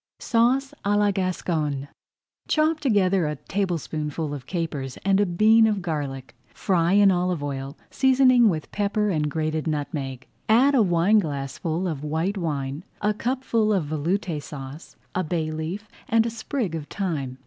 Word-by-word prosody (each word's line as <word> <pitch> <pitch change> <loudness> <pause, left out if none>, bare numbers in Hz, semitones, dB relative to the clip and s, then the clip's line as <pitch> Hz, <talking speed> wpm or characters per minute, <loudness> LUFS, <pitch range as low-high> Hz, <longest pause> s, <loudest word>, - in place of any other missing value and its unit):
SAUCE 250 +4 +1
À 205 +1 +2
LA 205 -1 +3
GASCONNE 160 -7 -2 0.6
Chop 310 +1 +2
together 195 - +2
a 150 - -2
tablespoonful 155 -3 -3
of 135 -3 -7
capers 150 -7 -3
and 195 0 +3
a 205 - +3
bean 220 +5 +5
of 205 -4 -1
garlic. 140 -6 -4
Fry 175 -2 +1
in 200 -1 +6
olive 180 -3 0
oil, 135 -1 -5
seasoning 255 -3 +5
with 155 -5 -3
pepper 210 +1 0
and 150 -3 0
grated 155 +1 -2
nutmeg. 140 -4 -3 0.2
Add 255 +6 +5
a 260 - +5
wineglassful 170 -3 +1
of 150 -4 -4
white 160 +6 -1
wine, 145 -2 -3 0.2
a 210 0 +1
cupful 230 -1 0
of 190 -7 +1
Veloute 155 +2 -2
Sauce, 140 +2 -9 0.2
a 185 - 0
bay 160 -2 -2
leaf, 165 +7 -5 0.2
and 225 0 +3
a 235 - -2
sprig 225 - -3
of 155 -2 -5
thyme. 150 -10 -3
175 Hz, 150 wpm, -24 LUFS, 150-210 Hz, 0.6 s, in